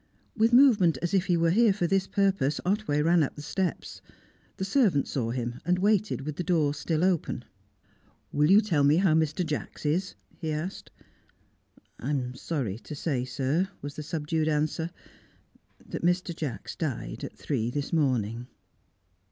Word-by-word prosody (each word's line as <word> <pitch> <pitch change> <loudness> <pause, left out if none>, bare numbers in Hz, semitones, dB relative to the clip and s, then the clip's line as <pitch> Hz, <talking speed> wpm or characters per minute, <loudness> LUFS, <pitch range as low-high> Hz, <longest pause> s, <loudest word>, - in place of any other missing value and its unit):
With 225 +1 +3
movement 235 - +6
as 175 - -1
if 190 -1 +2
he 175 -2 +3
were 165 0 +3
here 225 +3 +5
for 190 -3 -1
this 195 +2 +1
purpose, 195 -9 +1
Otway 185 -7 +1
ran 170 +1 +4
up 145 - -1
the 150 - -8
steps; 175 +4 -3 0.6
the 190 - -2
servant 195 - +2
saw 120 -4 -2
him, 120 0 -3
and 180 +2 +1
waited 205 -2 +1
with 150 +1 -5
the 180 - -2
door 155 -4 +2
still 155 +2 -1
open. 185 -4 0 0.9
"Will 150 +1 +2
you 200 +3 +7
tell 170 -10 +1
me 145 +2 +5
how 180 -3 +3
Mr. 160 +2 +1
Jacks 155 0 -5
is?" 175 +6 0 0.2
he 160 -3 -3
asked. 155 +5 -4 1.1
"I 130 - -4
am 130 -4 -1
sorry 125 - -3
to 150 - -8
say, 140 -4 -1
sir," 140 +8 0
was 145 0 -5
the - - -5
subdued 155 +1 -2
answer, 155 +2 0 1.0
"that - - -5
Mr. 175 0 +1
Jacks 150 -7 -5
died 125 - -4
at - - -7
three 120 -6 -1
this 145 +5 -4
morning." 125 -6 0
160 Hz, 170 wpm, -27 LUFS, 145-185 Hz, 1.1 s, you